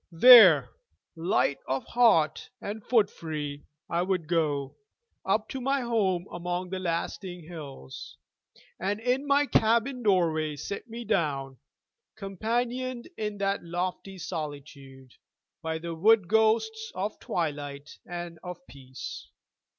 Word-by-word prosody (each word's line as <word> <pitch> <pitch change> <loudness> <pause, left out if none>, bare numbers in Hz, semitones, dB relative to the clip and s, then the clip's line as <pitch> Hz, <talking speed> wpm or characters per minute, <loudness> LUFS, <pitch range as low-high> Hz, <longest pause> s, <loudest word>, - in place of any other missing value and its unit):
There, 170 - +9 0.4
light 165 -4 +1
of 135 0 -2
heart 225 -11 +3
and 210 0 -6
footfree, 155 -10 -1 0.2
I 170 - 0
would 180 -3 -1
go 150 -5 0 0.5
Up - - +1
to 265 - -5
my 270 +2 +1
home 200 -7 0
among 180 +1 -4
the 190 - -2
lasting 175 +1 -3
hills, 150 - -9 0.6
And 200 +3 -1
in 250 +5 0
my 285 +1 +4
cabin 235 +1 +2
doorway 165 -7 +2
sit 200 - -6
me 235 +1 -7
down, 140 -10 -1 0.6
Companioned 240 - -3
in 210 -1 -3
that 200 0 -1
leafy 180 +3 -4
solitude 140 -6 -7 0.5
By 160 -1 -2
the 170 +1 -5
wood 200 +3 +4
ghosts 220 +1 +2
of 200 +3 -3
twilight 145 -3 -4
and 175 -2 -7
of 180 -1 -8
peace. 130 -1 -9
180 Hz, 120 wpm, -28 LUFS, 155-220 Hz, 0.6 s, There